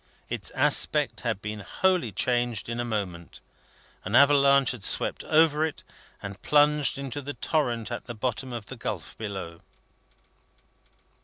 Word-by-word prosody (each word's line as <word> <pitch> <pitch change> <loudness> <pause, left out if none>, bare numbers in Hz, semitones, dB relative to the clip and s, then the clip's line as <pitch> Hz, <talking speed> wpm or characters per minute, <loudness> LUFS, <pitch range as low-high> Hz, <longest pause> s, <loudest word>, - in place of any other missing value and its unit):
Its - - -2
aspect - - +2
had 95 - -3
been 105 0 -4
wholly 180 - 0
changed 120 +2 -1
in 120 0 -3
a - - 0
moment. 100 -7 -5 0.6
An 100 +5 -2
avalanche 140 -1 +5
had 120 -6 -8
swept - - +2
over 155 -1 +4
it, 160 -1 -3 0.4
and 100 0 -7
plunged 150 -1 +3
into 140 0 -5
the 145 +1 -6
torrent 120 -7 -1
at 120 - -5
the 120 - -6
bottom 125 +3 -3
of 115 -3 -6
the 130 - -9
gulf 100 -8 -5
below. 95 -6 -6
120 Hz, 145 wpm, -26 LUFS, 105-140 Hz, 0.6 s, avalanche